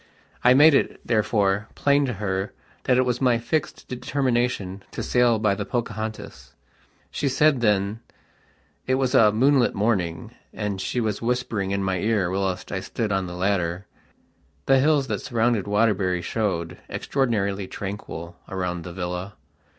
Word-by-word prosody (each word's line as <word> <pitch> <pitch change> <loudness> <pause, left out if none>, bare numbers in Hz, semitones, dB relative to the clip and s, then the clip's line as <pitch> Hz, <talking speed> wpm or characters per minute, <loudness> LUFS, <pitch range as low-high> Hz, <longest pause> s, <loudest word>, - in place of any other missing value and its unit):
I 125 +1 +6
made 150 +3 +7
it, - - +1
therefore, 105 -2 +1
plain 140 0 +2
to 125 - -2
her 95 -1 -3 0.3
that 125 - +3
it 130 - +3
was 125 0 -1
my 125 -3 +4
fixed 140 +6 -3
determination 125 -7 -1
to - - -5
sail 120 -2 +3
by 105 -2 +2
the - - -3
"Pocahontas". 110 - -5 0.6
She 140 - -1
said 140 0 +3
thenit 105 -1 +1 0.9
was 130 0 +1
a 105 -2 +6
moonlit 130 +3 +3
morning, 95 -6 -1 0.2
and 100 -2 -3
she 125 - -2
was 110 -3 -1
whispering 115 -5 -1
in 100 0 -1
my 95 -1 0
ear 100 -3 +1
whilst 95 -1 -2
I 100 - -1
stood 105 +3 -3
on 95 -1 0
the 90 - -7
ladder. 90 -1 -1 0.8
The 135 0 +5
hills 145 0 +3
that 105 -5 -3
surround 115 -4 0
Waterbury 100 -4 +1
showed, 95 -6 -2
extraordinarily 100 -8 -1
tranquil, 90 -4 -7
around 90 -2 -3
the 90 - -8
villa. 90 +2 -4
105 Hz, 150 wpm, -24 LUFS, 95-125 Hz, 0.9 s, made